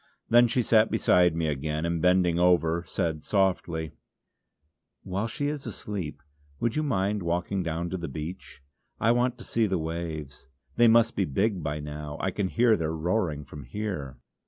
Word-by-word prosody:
Then 120 +1 +6
she 125 +1 +1
sat 110 -1 +4
beside 90 -5 +3
me 85 -1 0
again, 75 +2 -2
and 85 -1 -1
bending 90 -1 +3
over 85 -1 +3
said 80 -5 -2
softly: 90 -5 0 1.1
"While 95 +4 -2
she 145 +5 -3
is 145 -3 -3
asleep 100 -7 -5 0.4
would 120 0 0
you 155 - +1
mind 105 -7 0
walking 90 +3 -1
down 85 0 -3
to 95 - -2
the 85 -1 -5
beach, 75 -1 -7 0.4
I 115 - +3
want 125 +1 +1
to 120 - -10
see 115 -2 +1
the 95 -2 0
waves. 80 -4 -5 0.3
They 120 - +5
must 115 +1 +4
be 95 - +1
big 95 +6 0
by 75 0 -3
now; 75 0 -6
I 95 - -1
can 100 +1 -1
hear 115 +3 +3
their 80 -3 -2
roaring 80 -3 -1
from 70 +1 -10
here." 70 - -5
90 Hz, 175 wpm, -27 LUFS, 80-110 Hz, 1.1 s, Then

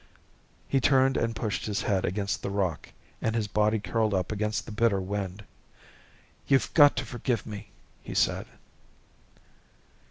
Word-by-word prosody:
He 135 - +1
turned 135 0 +4
and 115 0 0
pushed 110 -1 -2
his 105 -2 -1
head 95 -3 +1
against 100 +2 -2
the - - -3
rock, 95 -5 -2 0.3
and 110 - 0
his 110 -3 0
body 105 +1 +2
curled 110 0 0
up 95 +1 -1
against 105 +1 -1
the - - -8
bitter 110 -2 +2
wind. 95 +1 -4 1.0
"You've 135 -1 +2
got 145 -2 +7
to - - -2
forgive 120 -2 -2
me," 105 -2 -8 0.3
he - - -8
said. - - +1
105 Hz, 150 wpm, -28 LUFS, 100-115 Hz, 1.0 s, got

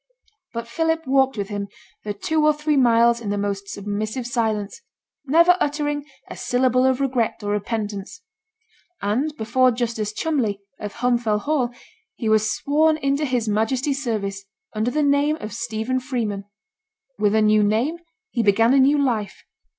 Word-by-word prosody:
But 235 0 -5
Philip 325 +6 -1
walked 265 -1 +2
with 200 -1 -3
him 205 -1 -4 0.4
the 210 - -3
two 310 +9 0
or 305 0 +5
three 300 0 0
miles 235 -2 +4
in 210 - -4
the 205 - -1
most 200 -1 -3
submissive 210 +5 -4
silence, 220 - -2 0.5
never 335 +5 +6
uttering 290 -2 -1 0.2
a - - -8
syllable 255 +1 +2
of 260 0 +1
regret 250 -5 -1
or 205 - -2
repentance; 205 -1 -4 0.8
and 240 +10 0
before 250 +4 +3
Justice 230 -3 -2
Cholmley, 225 -7 -1 0.2
of 205 -1 -6
Holm 245 +1 +1
Fell 215 -3 0
Hall, 265 +1 0 0.5
he 230 - -4
was 215 0 +3
sworn 310 +6 +2
into 280 0 0
his 250 -4 -1
Majesty's 260 +7 0
service, 200 -5 -3 0.3
under 215 +2 0
the 300 +4 0
name 285 +1 +3
of 220 -9 -7
Stephen 235 +2 -2
Freeman. 230 -7 -3 0.7
With 210 0 +2
a 220 - +4
new 215 0 +4
name, 230 +11 +1 0.3
he 235 - 0
began 225 +3 +4
a 275 - +5
new 280 +3 +5
life. 230 -8 -1
235 Hz, 160 wpm, -22 LUFS, 215-275 Hz, 0.8 s, never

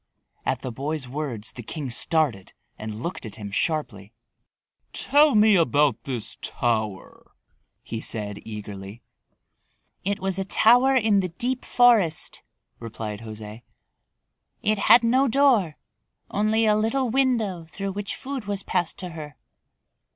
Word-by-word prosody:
At - - -1
the 130 - -4
boy's 140 +3 -3
words 125 -5 -4
the 120 - -9
king 135 +2 -5
started 125 - +1 0.3
and 110 +1 -6
looked 175 - -4
at 110 - -8
him 105 -2 -8
sharply. 105 - -2 0.8
"Tell 295 -1 +4
me 210 0 +6
about 145 - +2
this 125 -6 -4
tower," 110 -5 -3 0.5
he 115 -1 -5
said 105 -3 -2
eagerly. 105 0 -8 1.0
"It 200 +1 -1
was 190 0 -2
a - - 0
tower 245 +7 +4
in 220 -5 +3
the 185 -1 -1
deep 245 +9 -2
forest," 225 -11 +3 0.4
replied 110 -2 -6
José. 110 0 -9 1.0
"It 215 0 +1
had 235 +4 +6
no 260 +4 +3
door, 240 - +3 0.6
only 215 +2 +2
a 210 -1 +4
little 225 +3 0
window 230 -10 0
through 195 +4 -5
which 200 +1 -4
food 265 -4 -6
was 200 -1 -3
passed 175 -3 -1
to 180 - -6
her. 155 -4 -9
165 Hz, 135 wpm, -24 LUFS, -, 1.0 s, me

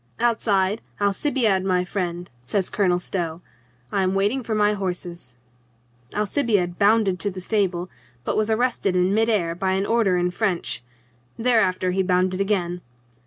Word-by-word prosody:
Outside, 215 -3 +1 0.2
"Alcibiade, 205 -1 +1
my 180 -1 +1
friend," 175 -2 -4
says 185 +10 -1
Colonel 185 -4 +2
Stow, 170 -2 -3 0.5
"I 195 - +1
am 190 0 +1
waiting 205 +7 +1
for 220 -2 -3
my 210 0 +3
horses." 175 - -5 0.8
Alcibiade 205 -5 0
bounded 205 -3 +3
to 205 - -1
the 185 -1 -7
stable, 185 -3 0 0.4
but - - -1
was 215 0 +1
arrested 220 -4 +1
in 180 +2 +2
mid 225 +2 +2
air 175 -7 +1
by 190 +2 -1
an 190 +1 0
order 220 -5 +2
in 180 0 +1
French. 180 - -1 0.5
Thereafter 220 -6 +2
he 190 +1 +1
bounded 185 0 +1
again. 180 -3 -1
190 Hz, 150 wpm, -23 LUFS, 180-215 Hz, 0.8 s, my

